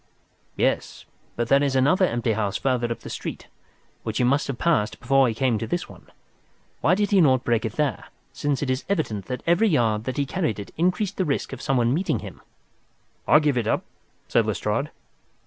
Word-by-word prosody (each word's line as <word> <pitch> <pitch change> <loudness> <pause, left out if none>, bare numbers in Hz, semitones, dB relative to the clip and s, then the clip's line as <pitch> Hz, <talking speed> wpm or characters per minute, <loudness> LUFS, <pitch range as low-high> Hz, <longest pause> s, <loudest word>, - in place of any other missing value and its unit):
"Yes, - - -1 0.3
but 120 -1 -1
there 140 +3 +4
is 140 -2 0
another 145 +9 +4
empty 120 -3 -1
house 105 -2 -1
farther 125 -3 0
up 115 - -4
the - - -10
street - - -6 0.5
which 110 -1 -4
he - - +2
must 140 +4 +2
have 135 -3 -4
passed 150 -11 +1
before 135 +1 +3
he 115 - -2
came 125 -3 +1
to 115 - -4
this 175 +9 -2
one. - - -15 0.7
Why 185 - +3
did 205 +1 0
he 195 -2 +5
not 130 -5 +4
break 115 -2 +1
it 110 - -3
there, 150 +1 -1 0.3
since 145 -1 -1
it 130 - 0
is 130 +1 -2
evident 110 - -1
that 125 -1 -5
every 175 +6 +3
yard 115 - +1
that 130 - -3
he 140 - +1
carried 155 - -1
it 100 - -8
increased 180 +4 0
the 190 - +1
risk 140 -2 -2
of 135 - -7
someone 125 -4 +1
meeting 180 +6 0
him?" - - -9 0.9
"I - - +7
give 145 -5 +2
it 110 - -2
up," - - +1 0.4
said - - +2
Lestrade. - - -1
135 Hz, 205 wpm, -24 LUFS, 115-155 Hz, 0.9 s, I